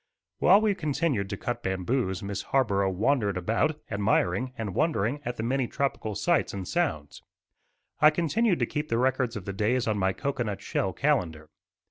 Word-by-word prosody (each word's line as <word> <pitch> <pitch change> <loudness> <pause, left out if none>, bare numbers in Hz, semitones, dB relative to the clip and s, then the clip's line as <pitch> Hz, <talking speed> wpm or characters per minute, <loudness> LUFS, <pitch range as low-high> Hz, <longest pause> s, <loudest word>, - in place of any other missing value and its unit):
While 195 +3 +6
we 215 -2 +2
continued 150 - -1
to 100 - -4
cut 120 - -3
bamboos 95 +1 -1
Miss 100 -1 -3
Harborough 100 -8 +1
wandered 100 0 +1
about 115 - 0
admiring 100 +3 +1
and 105 -4 -4
wondering 145 - 0
at 120 0 -3
the 110 - -3
many 130 +1 0
tropical 115 -6 -2
sights 170 - +1
and 95 -2 -5
sounds. 145 - -2 0.8
I 150 +1 +8
continued 175 +6 +1
to - - +1
keep 150 0 -4
the 115 - +1
records 130 -1 +1
of 100 -4 -6
the 100 - -4
days 115 +5 0
on 105 -2 0
my 95 0 +2
cocoanut 120 -5 -3
shell 95 -1 -1
calendar. 90 - -1
115 Hz, 170 wpm, -27 LUFS, 100-145 Hz, 0.8 s, I